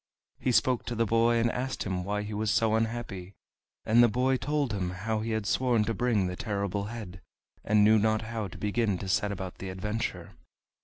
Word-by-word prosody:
He 130 Hz, -, +1 dB
spoke 125 Hz, 0 st, +2 dB
to 120 Hz, -, -3 dB
the 115 Hz, 0 st, +2 dB
boy, 115 Hz, +2 st, +3 dB
and 115 Hz, 0 st, +2 dB
asked 130 Hz, +2 st, -3 dB
him 90 Hz, -2 st, -2 dB
why 105 Hz, +2 st, -2 dB
he 105 Hz, +1 st, -6 dB
was 105 Hz, +1 st, -1 dB
so 110 Hz, +1 st, +2 dB
unhappy; 110 Hz, -4 st, -2 dB, 0.5 s
and 115 Hz, +2 st, +5 dB
the 120 Hz, -, +7 dB
boy 125 Hz, +4 st, +1 dB
told 140 Hz, -1 st, -1 dB
him 95 Hz, -3 st, -1 dB
how 105 Hz, +5 st, -2 dB
he 110 Hz, +1 st, -3 dB
had 110 Hz, -2 st, -1 dB
sworn 120 Hz, -1 st, +2 dB
to 115 Hz, -, -1 dB
bring 110 Hz, -3 st, +1 dB
the 90 Hz, 0 st, -3 dB
Terrible 100 Hz, 0 st, -2 dB
Head, 105 Hz, -5 st, -8 dB, 0.4 s
and 105 Hz, 0 st, +4 dB
knew 110 Hz, +1 st, +6 dB
not 110 Hz, +1 st, +1 dB
how 110 Hz, -2 st, -4 dB
to 90 Hz, -, -11 dB
begin 105 Hz, -1 st, 0 dB
to 95 Hz, -, -6 dB
set 105 Hz, +2 st, +1 dB
about 95 Hz, -2 st, -6 dB
the 95 Hz, -, -5 dB
adventure. 105 Hz, +5 st, -4 dB
110 Hz, 210 wpm, -29 LUFS, 100-115 Hz, 0.5 s, the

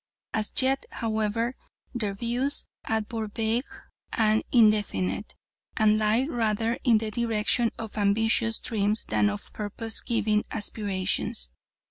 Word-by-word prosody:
As 215 Hz, -1 st, -1 dB
yet, 265 Hz, +1 st, +2 dB
however, 225 Hz, +2 st, -1 dB, 0.4 s
their 210 Hz, -5 st, -2 dB
views 245 Hz, +6 st, +1 dB, 0.2 s
are 220 Hz, 0 st, 0 dB
but 215 Hz, -1 st, -5 dB
vague 230 Hz, +3 st, 0 dB, 0.4 s
and 220 Hz, -1 st, +2 dB
indefinite, 210 Hz, -, +2 dB, 0.4 s
and 215 Hz, 0 st, +4 dB
lie 220 Hz, +4 st, +2 dB
rather 225 Hz, -3 st, 0 dB
in 235 Hz, -3 st, +5 dB
the 215 Hz, 0 st, -3 dB
direction 230 Hz, 0 st, +1 dB
of 220 Hz, -1 st, -6 dB
ambitious 225 Hz, +2 st, +2 dB
dreams 215 Hz, -2 st, 0 dB
than 210 Hz, -, +2 dB
of 205 Hz, 0 st, -7 dB
purpose 220 Hz, +2 st, -1 dB
giving 215 Hz, -3 st, +1 dB
aspirations. 190 Hz, -, -2 dB
220 Hz, 120 wpm, -27 LUFS, 210-230 Hz, 0.4 s, in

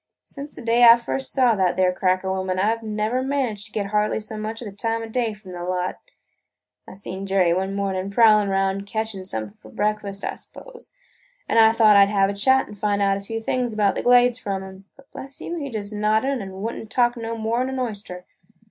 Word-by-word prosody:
Since 285 Hz, +1 st, -10 dB
the -, -, -9 dB
day 235 Hz, +1 st, +3 dB
I 235 Hz, 0 st, +9 dB
first 260 Hz, +3 st, -3 dB
saw 255 Hz, -3 st, +3 dB
that 185 Hz, -4 st, 0 dB
there 185 Hz, -1 st, +3 dB
cracker 185 Hz, 0 st, 0 dB
woman, 185 Hz, -1 st, -2 dB
I 210 Hz, +4 st, +2 dB
've 230 Hz, -, -14 dB
never 215 Hz, +3 st, -2 dB
managed 260 Hz, -6 st, -2 dB
to -, -, -19 dB
get 200 Hz, -2 st, -3 dB
hardly 210 Hz, 0 st, +1 dB
so 215 Hz, 0 st, -9 dB
much 215 Hz, +1 st, -5 dB
as 245 Hz, -, -8 dB
the -, -, -7 dB
time 225 Hz, +2 st, -2 dB
o' -, -, -6 dB
day 225 Hz, -1 st, -2 dB
from 205 Hz, -3 st, -13 dB
the 175 Hz, -1 st, -6 dB
lot. 180 Hz, 0 st, -2 dB, 0.9 s
I -, -, -10 dB
seen 195 Hz, 0 st, -7 dB
Jerry 190 Hz, -3 st, +3 dB
one 190 Hz, +2 st, -2 dB
morning 195 Hz, -1 st, -2 dB
prowling 210 Hz, -1 st, +5 dB
around 195 Hz, 0 st, -1 dB
catchin' 220 Hz, -3 st, -4 dB
something 110 Hz, -, -5 dB
for 110 Hz, -, -14 dB
breakfast, 205 Hz, -, -3 dB
I -, -, -2 dB
s'pose, -, -, -13 dB, 0.6 s
an' 230 Hz, -, +3 dB
I 220 Hz, 0 st, +7 dB
thought 220 Hz, -2 st, +5 dB
I 200 Hz, 0 st, +7 dB
'd -, -, -5 dB
have 195 Hz, -1 st, +2 dB
a -, -, -5 dB
chat 260 Hz, +6 st, +2 dB
an' -, -, -11 dB
find 205 Hz, 0 st, -1 dB
out 195 Hz, -1 st, +2 dB
a -, -, -7 dB
few 225 Hz, +3 st, -6 dB
things 245 Hz, -1 st, -1 dB
about 205 Hz, -2 st, +2 dB
the -, -, -3 dB
Glades 245 Hz, 0 st, +4 dB
from 195 Hz, -1 st, -4 dB
him. 190 Hz, 0 st, -12 dB
But, 275 Hz, 0 st, -21 dB
bless 270 Hz, 0 st, -9 dB
you, 345 Hz, -, -5 dB
he 285 Hz, -3 st, -4 dB
just 215 Hz, -3 st, -6 dB
nodded 220 Hz, +5 st, 0 dB
an' 190 Hz, 0 st, -8 dB
would 230 Hz, -, -2 dB
n't 220 Hz, -, -9 dB
talk 240 Hz, +1 st, +2 dB
no 230 Hz, -1 st, -5 dB
more 225 Hz, +2 st, -1 dB
'n 260 Hz, -, -1 dB
an 265 Hz, -, -4 dB
oyster! 205 Hz, -7 st, -5 dB
210 Hz, 235 wpm, -23 LUFS, 195-230 Hz, 0.9 s, I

